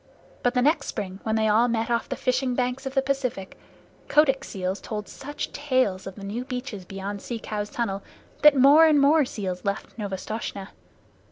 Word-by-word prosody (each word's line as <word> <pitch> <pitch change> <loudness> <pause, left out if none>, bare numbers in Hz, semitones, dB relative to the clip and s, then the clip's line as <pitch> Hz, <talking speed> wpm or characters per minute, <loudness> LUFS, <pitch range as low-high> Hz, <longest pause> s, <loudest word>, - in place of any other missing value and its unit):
But 245 +1 +1
next 285 +6 +2
spring, 190 -1 -5
when 220 0 -1
they 220 0 +2
all 220 +3 +4
met 230 0 -1
off 235 - 0
the - - -2
fishing 255 0 0
banks 255 +2 -1
of 265 - -6
the 270 - +3
Pacific, 265 -8 -2 0.5
Kotick's 285 -3 +3
seals 190 0 -3
told 210 -2 -5
such 290 +1 -6
tales 255 -10 0
of 195 - -7
the 200 - -10
new 215 +5 -4
beaches 250 -7 -6
beyond 195 +1 -6
Sea 240 - -4
Cow's 210 -2 -4
tunnel 200 -5 -2 0.4
that 300 -2 +7
more 290 +5 +8
and 300 -2 +5
more 290 +1 +5
seals 190 -6 -4
left 200 -1 -3
Novastoshnah. 200 0 -4
235 Hz, 180 wpm, -25 LUFS, 200-270 Hz, 0.5 s, more